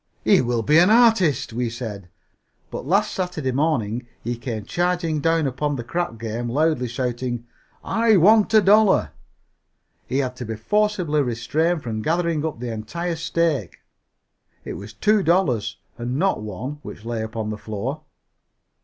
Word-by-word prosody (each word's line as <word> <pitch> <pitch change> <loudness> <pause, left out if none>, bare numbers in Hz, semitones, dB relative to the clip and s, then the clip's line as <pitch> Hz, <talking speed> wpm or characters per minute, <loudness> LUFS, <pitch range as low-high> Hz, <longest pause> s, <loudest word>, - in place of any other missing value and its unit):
"He - - +5
will 120 -2 -1
be 150 +7 +5
an 180 +3 +5
artist," 220 - +4
we 120 0 -1
said, 110 -6 -7 0.6
but - - -6
last 205 +5 +2
Saturday 180 -8 -2
morning 125 -5 0 0.2
he 120 +1 -2
came 115 -3 -5
charging 175 - 0
down 165 +1 +2
upon 145 +2 -1
the 120 - -4
crap 175 +1 -3
game 115 +2 -4
loudly 150 -1 +1
shouting, 120 -1 -3 0.4
"I 225 -2 +3
want 210 +5 +5
a 215 - +8
dollar!" 210 +1 +4 1.0
He 130 - -1
had 130 -2 -1
to 125 - -5
be 110 0 -4
forcibly 180 - +1
restrained 145 +7 0
from 110 -2 -3
gathering 165 +1 0
up 155 -7 -3
the 120 -1 -4
entire 170 +11 -4
stake 160 - -1 0.9
it - - -5
was - - -8
two 215 -1 +2
dollars 170 - +1 0.2
and 125 +2 -2
not 190 - +1
one 110 +8 -6
which 110 - -10
lay 115 -1 -2
upon 110 -1 -4
the 105 - -4
floor. 115 +9 -4
140 Hz, 155 wpm, -22 LUFS, 120-175 Hz, 1.0 s, a